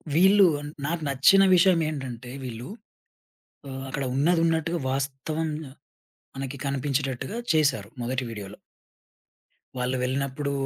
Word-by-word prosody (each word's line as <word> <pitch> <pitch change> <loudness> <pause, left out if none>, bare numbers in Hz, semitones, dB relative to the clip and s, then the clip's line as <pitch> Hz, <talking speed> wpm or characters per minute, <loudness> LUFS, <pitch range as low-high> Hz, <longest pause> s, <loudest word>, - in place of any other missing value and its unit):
వీళ్ళు 195 +4 +6 0.4
నాకు 165 +2 -2
నచ్చిన 140 +9 +6
విషయం 180 -1 +5
ఏంటంటే 130 -5 -6
వీళ్ళు 120 -1 -6 1.0
ఆహ్, 135 0 -6
అక్కడ 140 +1 -3
ఉన్నది 165 +5 +3
ఉన్నట్టుగా 165 +1 0
వాస్తవం 140 +4 -2 0.9
మనకి 135 0 -5
కనిపించేటట్టుగా 140 - -2 0.2
చేసారు 150 -3 +2
మొదటి 130 +2 -1
వీడియోలో. 105 -2 -8 1.2
వాళ్ళు 125 +1 -1
వెళ్ళినప్పుడు 140 +2 -1
140 Hz, 100 wpm, -26 LUFS, 130-160 Hz, 1.2 s, వీళ్ళు